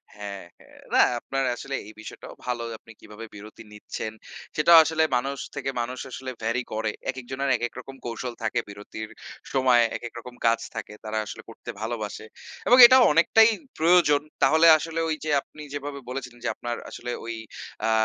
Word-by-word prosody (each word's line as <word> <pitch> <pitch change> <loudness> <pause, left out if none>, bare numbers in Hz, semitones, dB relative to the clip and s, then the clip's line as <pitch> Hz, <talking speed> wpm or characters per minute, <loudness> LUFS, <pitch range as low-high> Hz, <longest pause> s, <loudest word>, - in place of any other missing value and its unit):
হ্যাঁ, 100 -1 -7 0.2
হ্যাঁ। - - -19 0.2
না - - +6 0.2
আপনার 135 +2 -2
আসলে 135 +3 -5
এই 110 - -11
বিষয়টাও - - -10
ভালো। 120 -1 -2
আপনি 115 - -17
কীভাবে 105 +2 -10
বিরতি 105 +2 -11
নিচ্ছেন, 110 +1 -6 0.4
সেটাও 165 +2 +7
আসলে 160 0 +1
মানুষ 135 +3 -3 0.2
থেকে 135 -1 -3
মানুষ 125 +2 -5
আসলে 130 0 -6
vary 115 +3 0
করে। 110 0 -1 0.2
একেকজনের 130 +1 -3
একেক 120 +1 -3
রকম 135 +2 -10
কৌশল 120 +1 -4
থাকে, 110 +2 0
বিরতির 105 +2 -8 0.4
সময় 130 -2 +4 0.2
একেক 120 - -8
রকম 125 +1 -11
কাজ 115 0 +4 0.2
থাকে, - - -6
তারা 110 0 -3
আসলে - - -8
করতে - - -11
ভালোবাসে 110 -2 -4 0.4
এবং 250 - +7
এটাও 255 +1 +8
অনেকটাই 220 +8 +6 0.3
প্রয়োজন। 160 -3 +5 0.2
তাহলে 160 +5 +6
আসলে 165 +1 -4
ওই 155 - +1
যে - - -2
আপনি 150 - -15
যেভাবে 145 0 -5
বলেছিলেন 125 -2 -6
যে, - - +1
আপনার 120 0 -4
আসলে 120 0 -6
ঐ - - -9 0.6
আ - - +2
125 Hz, 170 wpm, -25 LUFS, 115-145 Hz, 0.6 s, এটাও